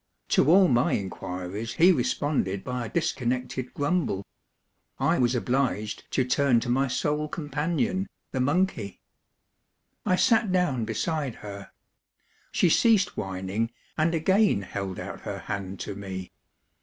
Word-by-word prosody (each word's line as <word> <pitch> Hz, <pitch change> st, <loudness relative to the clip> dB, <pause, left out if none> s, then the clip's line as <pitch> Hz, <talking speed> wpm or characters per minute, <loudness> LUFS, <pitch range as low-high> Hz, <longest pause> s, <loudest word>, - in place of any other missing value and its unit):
To 145 Hz, -, +4 dB
all 185 Hz, +2 st, +7 dB
my 120 Hz, -5 st, +3 dB
inquiries 95 Hz, +3 st, -4 dB
he 175 Hz, +3 st, +6 dB
responded 125 Hz, -, 0 dB
by 125 Hz, -2 st, -3 dB
a -, -, -9 dB
dis 165 Hz, -1 st, +1 dB
connected 125 Hz, 0 st, -3 dB
grumble. 145 Hz, -, 0 dB, 0.7 s
I -, -, +2 dB
was 125 Hz, 0 st, +2 dB
obliged 125 Hz, -3 st, -1 dB
to 130 Hz, -, +2 dB
turn 130 Hz, -1 st, +3 dB
to 120 Hz, -, -4 dB
my 135 Hz, +3 st, +2 dB
sole 150 Hz, +3 st, 0 dB
companion, 165 Hz, -, -1 dB, 0.2 s
the 130 Hz, -, -2 dB
monkey. 140 Hz, -, 0 dB, 1.0 s
I 185 Hz, -, +3 dB
sat 225 Hz, +1 st, +3 dB
down 150 Hz, -11 st, +1 dB
beside 135 Hz, +4 st, -2 dB
her; 100 Hz, -1 st, -8 dB, 0.8 s
she -, -, +3 dB
ceased 210 Hz, +2 st, +4 dB
whining, 95 Hz, +3 st, -2 dB, 0.3 s
and 165 Hz, +2 st, +2 dB
again 190 Hz, -, +3 dB
held 95 Hz, 0 st, -5 dB
out -, -, -6 dB
her -, -, -5 dB
hand 100 Hz, -2 st, -5 dB
to 100 Hz, -, -4 dB
me. 95 Hz, -2 st, -6 dB
125 Hz, 135 wpm, -27 LUFS, 100-160 Hz, 1.0 s, all